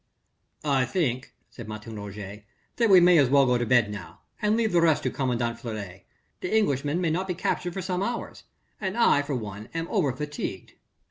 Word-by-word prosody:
"I 135 -3 +2
think," 130 -4 -1 0.2
said 120 -3 -10
Martin 110 +1 -7
Roget, 105 0 -8 0.3
"that 230 -2 +3
we 190 -2 +9
may 175 -1 +6
as 135 -3 +4
well 140 0 +5
go 125 -1 +2
to 120 - -1
bed 120 -3 +4
now, 100 -5 -9 0.2
and 210 +1 +2
leave 225 -2 +1
the 175 - +4
rest 160 -3 +3
to - - 0
commandant 120 -3 -1
Fleury. 105 -6 -7 0.3
The 180 - -4
Englishman 145 -5 +1
may 170 -3 +1
not 185 +4 -1
be 180 - -2
captured 175 0 -2
for 190 - -3
some 180 0 -2
hours, 235 +4 -4 0.3
and 195 +1 -3
I 190 -11 +5
for 145 -1 -3
one 105 -2 -6
am 165 0 -2
over 175 -11 +2
fatigued." 150 +3 -5
140 Hz, 200 wpm, -26 LUFS, 115-180 Hz, 0.3 s, we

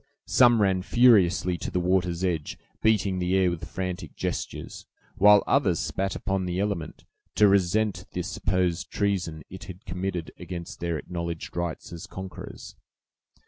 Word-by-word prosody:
Some 120 -4 +5
ran 95 -2 +2
furiously 95 -6 +4
to - - -4
the 90 - -1
water's 90 -1 +1
edge, 85 -5 -1 0.2
beating 100 -4 +2
the 90 +1 +1
air 95 -2 +3
with 85 - -5
frantic 90 -1 -5
gestures, - - -5 0.3
while 105 +1 +7
others - - +2
spat 95 0 -2
upon 95 -2 -1
the 90 +1 -2
element, 100 -6 -3 0.3
to 105 - +6
resent 100 +2 +2
the - - -2
supposed 90 -2 -1
treason 90 -7 -1
it 95 - -9
had 95 -1 -11
committed 90 -2 -3
against 85 -1 -7
their 85 -2 -1
acknowledged 85 0 -5
rights 85 -1 -4
as 85 +3 -8
conquerors. 95 -1 -9
90 Hz, 145 wpm, -26 LUFS, 85-100 Hz, 0.3 s, while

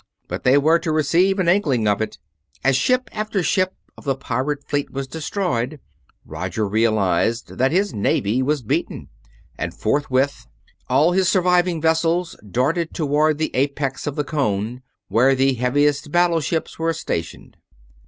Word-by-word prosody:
But - - -5
they 130 +2 +5
were 160 +4 +4
to 165 -1 -2
receive 170 +6 +2
an 185 -3 0
inkling 145 - +2
of 105 +1 +1
it. 110 -1 -3 0.5
As 135 -1 +3
ship 255 - +1
after 215 -3 -2
ship 185 +2 +1 0.2
of - - -14
the 135 -2 0
pirate 140 +3 -3
fleet 145 -1 -1
was 135 0 -4
destroyed, 155 - -2 0.5
Roger 110 -1 -3
realized 110 +1 +1
that 130 +1 +3
his 195 +4 +1
navy 105 +3 +1
was 145 0 0
beaten, - - -3 0.5
and - - -4
forthwith 135 +3 0 0.4
all 145 +7 +4
his 185 0 +2
surviving 180 -2 +2
vessels 165 +2 +1
darted 155 - 0
toward 150 0 +1
the 155 0 -2
apex 140 +1 -1
of 145 - -2
the 150 - 0
cone, 125 -5 -2 0.3
where 130 +4 +3
the 135 +1 +2
heaviest 145 +4 +1
battleships 165 -3 0
were 165 0 +1
stationed. 85 - -5
145 Hz, 150 wpm, -21 LUFS, 130-170 Hz, 0.5 s, they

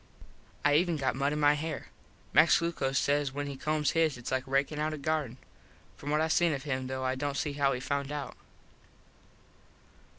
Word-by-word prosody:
I 145 0 +5
even 170 -1 +1
got 135 -2 0
mud 140 +2 0
in 150 - -2
my 145 0 +5
hair. 155 +2 -4 0.4
Max - - +6
Glucos 140 -6 -1
says 145 0 +1
when 145 +1 -4
he 140 -1 -5
combs 150 +2 0
his 160 -5 +2
its 120 - -7
like 130 0 -1
rakin 140 +3 0
out 155 +1 -1
a - - -8
garden. 145 -4 -2 0.6
From 145 - -7
what 150 +1 +2
I 160 - +2
seen 165 0 +3
of 135 -1 -4
him 130 -3 -2
though 130 0 -4
I 130 0 +1
dont 140 +1 -3
see 145 - -1
how 140 -1 +2
he 125 - -2
found 140 +2 -2
out. 145 -2 -5
145 Hz, 200 wpm, -30 LUFS, 135-155 Hz, 0.6 s, Max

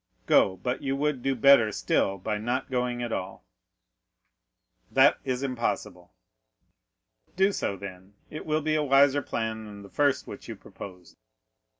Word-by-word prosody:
"Go; 95 -1 +4
but 125 +8 -3
you 135 -1 -1
would 145 -2 -1
do 135 +1 0
better 120 -3 +6
still 100 -1 0
by 105 +3 -3
not 125 +5 -2
going 125 -1 -1
at 120 - -4
all." 95 - -5 1.4
"That - - +5
is 130 0 -2
impossible." 105 -8 -3 1.2
"Do 190 +2 +3
so, 100 - -2
then; 95 0 -10
it 155 - -8
will 155 0 +1
be 155 +1 0
a 155 - +2
wiser 140 0 +4
plan 110 -3 -3
than 100 -1 -10
the 100 - -12
first 145 -2 +1
which - - -10
you - - -6
proposed." 90 -3 -12
120 Hz, 155 wpm, -27 LUFS, 100-140 Hz, 1.4 s, better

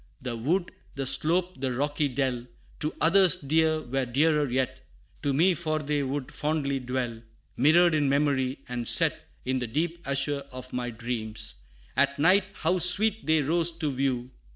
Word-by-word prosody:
The 125 -3 -4
wood, 170 +11 -1 0.2
the 135 -1 -3
slope, 175 +4 +1
the 130 -2 -1
rocky 145 +3 0
dell, 125 -2 -2 0.3
To 150 - -2
others 185 +1 +5
dear, 155 +2 +1
were 130 +1 -2
dearer 150 +3 +2
yet 130 +1 -1 0.4
To 145 - 0
me; 170 +7 +4
for 160 -2 -2
they 150 -1 -1
would 135 0 -3
fondly 145 -3 -1
dwell 125 -2 -3 0.3
Mirrored 165 +6 +5
in 145 -3 +2
memory; 140 -2 0
and 120 -2 -4
set - - +2 0.2
In 130 0 0
the 125 - -3
deep 165 +8 -2
azure 140 0 0
of 130 0 -9
my 125 -1 -2
dreams 110 -2 -4 0.4
At 140 0 +2
night, 185 +6 +4
how 185 - 0
sweet 200 +5 +2
they 155 -1 +3
rose 170 +3 +3
to 155 -4 -1
view! 130 -2 -2
140 Hz, 165 wpm, -27 LUFS, 130-160 Hz, 0.4 s, others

